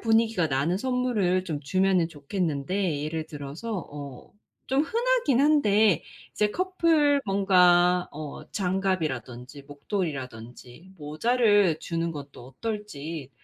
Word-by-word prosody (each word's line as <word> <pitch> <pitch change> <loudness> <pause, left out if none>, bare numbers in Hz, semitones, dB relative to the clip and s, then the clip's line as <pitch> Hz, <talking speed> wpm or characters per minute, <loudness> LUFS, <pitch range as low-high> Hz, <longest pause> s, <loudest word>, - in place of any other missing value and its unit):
분위기가 225 -5 +2
나는 145 +5 0
선물을 240 -7 0
좀 160 -5 -3
주면은 185 +3 +2
좋겠는데 160 +1 -2
예를 155 +1 -3
들어서 155 +9 -6
어 140 -3 -9 0.4
좀 270 +2 +2
흔하기는 455 - +1
한데 215 - +4 0.3
이제 210 0 0
커플 330 - +2
뭔가 180 -2 +4
어 150 -1 -8
장갑이라든지 150 - -2
목도리라든지 140 - -6
모자를 200 +3 +2
주는 165 0 -2
것도 140 -4 -10
어떨지 160 - -6
180 Hz, 265 characters per minute, -26 LUFS, 145-215 Hz, 0.4 s, 한데